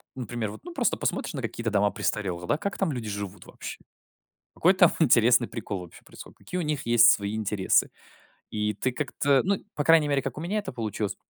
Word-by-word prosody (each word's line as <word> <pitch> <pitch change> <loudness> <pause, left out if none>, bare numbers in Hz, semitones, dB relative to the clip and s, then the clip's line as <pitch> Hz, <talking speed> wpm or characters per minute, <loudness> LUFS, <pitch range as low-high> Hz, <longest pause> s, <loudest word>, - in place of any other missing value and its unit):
например, 120 -4 -4
вот, - - -11
ну, 350 -1 -9
просто - - +1
посмотришь - - -2
на 135 - -4
какие-то 115 0 -3
дома 100 -1 +2
престарелых, 90 -4 -2
да. 150 - +1
Как 200 +4 -4
там 190 -5 +1
люди 115 -5 -4
живут 100 -2 -6
вообще? - - -8 0.8
Какой 185 +3 +4
там 180 -2 +6
интересный 120 -4 +5
прикол 105 -4 -5
вообще 90 -2 -12
происходит? - - -13
Какие 180 - -5
у 180 - 0
них 150 -2 -2
есть 120 0 +6
свои 100 +1 0
интересы? 105 -3 +1 0.6
И 105 0 -1
ты 130 +6 -1
как-то 140 0 +1
ну, 195 0 +1 0.2
по 145 - -1
крайней 160 -1 +5
мере, 140 -1 +1
как - - -5
у - - -5
меня 200 +5 -1
это 205 - -6
получилось. 110 -4 -3
120 Hz, 205 wpm, -26 LUFS, 105-150 Hz, 0.8 s, там